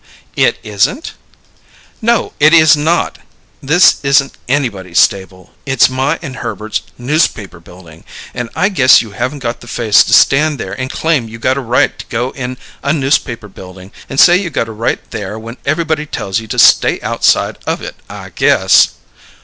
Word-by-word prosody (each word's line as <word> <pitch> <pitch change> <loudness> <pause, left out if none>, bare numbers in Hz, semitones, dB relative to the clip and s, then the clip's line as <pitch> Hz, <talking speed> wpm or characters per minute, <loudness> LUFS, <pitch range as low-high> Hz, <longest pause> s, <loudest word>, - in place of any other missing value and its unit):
"It - - +2
isn't?" 105 - -2 0.9
"No, 235 0 0
it 155 +3 +5
is 155 -1 +6
not! 160 +4 -1 0.4
This 160 +6 +4
isn't 140 0 +2 0.2
anybody's 105 -11 -2
stable. 95 -2 0
It's 135 -2 +2
my 135 +5 -1
and 135 -4 -7
Herbert's 110 0 -4 0.2
Newspaper 120 - -1
Building, 85 -1 -16 0.3
and 120 -1 -5
I 195 - +1
guess 135 -12 +5
you 110 - -12
haven't 130 +6 -4
got 115 0 -3
the 120 - -13
face 115 -4 +3
to - - -5
stand 150 +2 +4
there 95 - -6
and 130 +5 -5
claim 150 -8 -1
you 115 - -10
got 130 +3 0
a 140 - -3
right 120 -1 0
to - - -8
go 120 +2 -3
in 130 -1 -6 0.2
a 140 +2 0
Newspaper 135 -6 -1
Building 95 0 -13 0.2
and 135 - -3
say 175 - +7
you 185 -1 -1
got 135 -6 -2
a - - -7
right 110 +2 -2
there 105 0 -6
when 115 +3 -9
everybody 155 0 -1
tells 95 -6 -3
you 110 - -10
to - - -5
stay - - +4
outside - - 0
of - - -2
it, - - -7 0.2
I - - -10
guess!" - - +3
130 Hz, 175 wpm, -14 LUFS, 110-150 Hz, 0.9 s, say